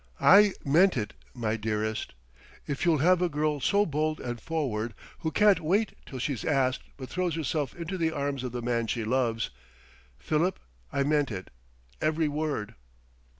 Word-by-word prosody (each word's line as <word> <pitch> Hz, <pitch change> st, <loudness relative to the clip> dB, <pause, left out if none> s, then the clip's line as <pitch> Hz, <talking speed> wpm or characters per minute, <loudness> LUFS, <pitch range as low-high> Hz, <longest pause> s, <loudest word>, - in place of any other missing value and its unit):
"I 200 Hz, 0 st, +7 dB
meant 170 Hz, +5 st, +4 dB
it, 105 Hz, -2 st, -2 dB, 0.2 s
my 115 Hz, -2 st, -1 dB
dearest.... 110 Hz, 0 st, -2 dB, 0.5 s
If 145 Hz, +3 st, -2 dB
you'll 165 Hz, -3 st, +4 dB
have 180 Hz, 0 st, +5 dB
a 180 Hz, -, +2 dB
girl 150 Hz, -1 st, 0 dB
so 200 Hz, +10 st, +3 dB
bold 155 Hz, 0 st, -1 dB
and 120 Hz, -2 st, -5 dB
forward, 120 Hz, -9 st, -2 dB, 0.2 s
who 160 Hz, -, -1 dB
can't 205 Hz, +3 st, +4 dB
wait 195 Hz, +7 st, +1 dB
till 130 Hz, -, -7 dB
she's 130 Hz, 0 st, -2 dB
asked 135 Hz, -4 st, +1 dB, 0.2 s
but 130 Hz, -2 st, -7 dB
throws 180 Hz, 0 st, -1 dB
herself 150 Hz, -3 st, -2 dB
into 175 Hz, +2 st, -5 dB
the 165 Hz, -1 st, +2 dB
arms 140 Hz, -3 st, -2 dB
of 125 Hz, -, -3 dB
the 120 Hz, 0 st, -4 dB
man 115 Hz, -1 st, 0 dB
she 115 Hz, +1 st, -1 dB
loves 115 Hz, -1 st, 0 dB, 0.7 s
Philip, 160 Hz, -, 0 dB, 0.3 s
I 140 Hz, -, +1 dB
meant 145 Hz, -1 st, +2 dB
it, 95 Hz, -4 st, -6 dB, 0.5 s
every 155 Hz, 0 st, +1 dB
word!..." 145 Hz, -8 st, -2 dB
145 Hz, 165 wpm, -28 LUFS, 120-165 Hz, 0.7 s, I